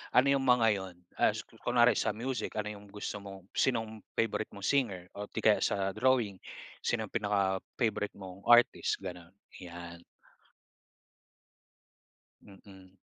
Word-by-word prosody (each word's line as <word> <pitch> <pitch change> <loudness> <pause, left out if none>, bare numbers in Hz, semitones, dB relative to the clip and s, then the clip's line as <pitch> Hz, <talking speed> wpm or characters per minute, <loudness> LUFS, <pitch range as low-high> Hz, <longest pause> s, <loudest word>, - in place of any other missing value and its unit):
ano 125 +2 +6
'yong 140 - +3
mga 125 -3 +4
'yon? 95 -3 -4 0.2
As - - +2
ku - - -21
kunware 120 0 +4
sa - - 0
music, 120 0 -3
ano 105 0 -2
'yong 105 -1 -11
gusto 105 +1 -5
mong 95 -1 -11
sinong 110 -4 0 0.2
favorite 110 -1 0
mong 100 - -10
singer 100 -8 0
o 105 0 -7
'di - - -5
kaya - - +5
sa 95 0 0
drawing, 110 -3 +1 0.4
sino - - -1
'yong - - -9
pinaka-favorite 100 +1 -1
mong 95 -1 -9
artist, 120 -4 +4
gano'n? 90 -1 -8 0.2
'Yan. 85 -1 -9 2.4
Mm. 95 -1 -15
100 Hz, 140 wpm, -31 LUFS, 95-115 Hz, 2.4 s, ano